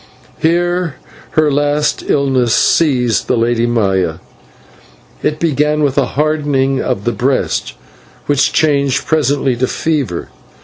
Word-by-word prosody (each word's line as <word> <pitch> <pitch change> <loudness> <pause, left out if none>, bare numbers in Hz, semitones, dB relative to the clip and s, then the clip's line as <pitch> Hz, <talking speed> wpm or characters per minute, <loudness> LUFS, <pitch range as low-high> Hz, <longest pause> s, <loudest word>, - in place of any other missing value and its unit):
Here 175 0 0 0.4
her 155 -1 +4
last 145 +1 0
illness 130 -4 +2
seized 125 -9 +2
the - - +1
Lady 120 0 +1
Maya. 95 -8 0 1.1
It 155 0 -1
began 150 -1 +1
with 140 -2 +1
a 140 - +2
hardening 145 -3 +1
of 100 - -2
the 120 - 0
breast, 130 +2 -1 0.5
which 145 -1 +2
changed 140 -4 +1
presently 145 -4 +1
to 130 +2 0
fever. 140 - -2
140 Hz, 120 wpm, -15 LUFS, 125-150 Hz, 1.1 s, her